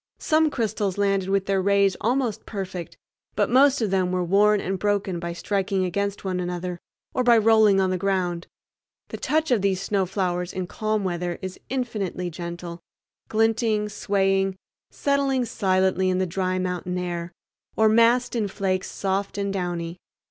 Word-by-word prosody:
Some 315 0 +2
crystals 215 -7 -2
landed 195 -2 +1
with 195 -1 +1
their 195 -1 +1
rays 200 0 +3
almost 240 -1 -1
perfect, 185 -4 -6 0.4
but - - +1
most 270 0 +5
of 205 - -1
them 185 -2 +1
were 180 -1 0
worn 205 +4 +4
and 190 0 -3
broken 200 -3 0
by 170 0 -4
striking 195 +1 -1
against 200 +2 -2
one 185 -1 -1
another, 180 0 -4 0.3
or 255 - +1
by 240 -1 +6
rolling 220 -2 +5
on 190 -1 +2
the 185 - -1
ground. 180 -3 -1 0.6
The - - -5
touch 315 -1 0
of 235 -5 +3
these 190 -2 +1
snow 195 -1 0
flowers 180 -2 -2
in 185 -1 -3
calm 215 +3 -2
weather 175 -1 -2
is 185 0 -6
infinitely 210 -9 -3
gentle—glinting, 210 +6 -2
swaying, 195 -1 +1 0.3
settling 275 -3 0
silently 190 -3 +1
in 185 - +1
the 185 - +1
dry 185 +1 -1
mountain 180 0 -2
air, 175 -1 -4 0.4
or 220 - +4
massed 230 +3 +4
in 220 -3 0
flakes 190 -1 -2
soft 195 +1 -2
and 200 -1 -1
downy. 175 -2 -3
195 Hz, 160 wpm, -24 LUFS, 180-215 Hz, 0.6 s, by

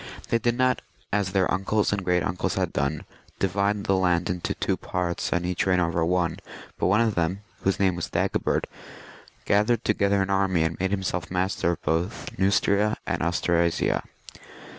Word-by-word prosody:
They 115 - +2
did 120 +1 0
not, 130 0 +2 0.3
as 100 -3 +1
their 95 -2 +2
uncles 100 +3 +1
and 100 -2 -2
great 90 -1 +2
uncles 90 - -1
had - - -1
done, 70 +3 -1 0.3
divide 100 +2 0
the 95 - +2
land 90 -2 +1
into 90 -1 -3
two - - 0
parts 90 -1 -3
and 85 0 0
each 90 +1 -1
reign 90 -1 +3
over 85 -1 +1
one; 85 -1 0 0.4
but - - +2
one 100 +5 +4
of 115 -2 +2
them, 85 +3 -1 0.2
whose 95 - 0
name 95 -3 +3
was 85 - -4
Dagobert, - - 0 0.8
gathered 105 +3 +2
to 105 - +3
gether 100 -1 +2
an 95 - -3
army 95 -4 +2
and 80 +1 -2
made 95 +1 0
himseK 95 -4 -2
mastier 90 -1 0
of - - -9
both 85 +6 -1
Neustria 100 +2 +2
and 90 -3 -2
Austrasia. 85 0 +1
95 Hz, 180 wpm, -25 LUFS, 85-100 Hz, 0.8 s, one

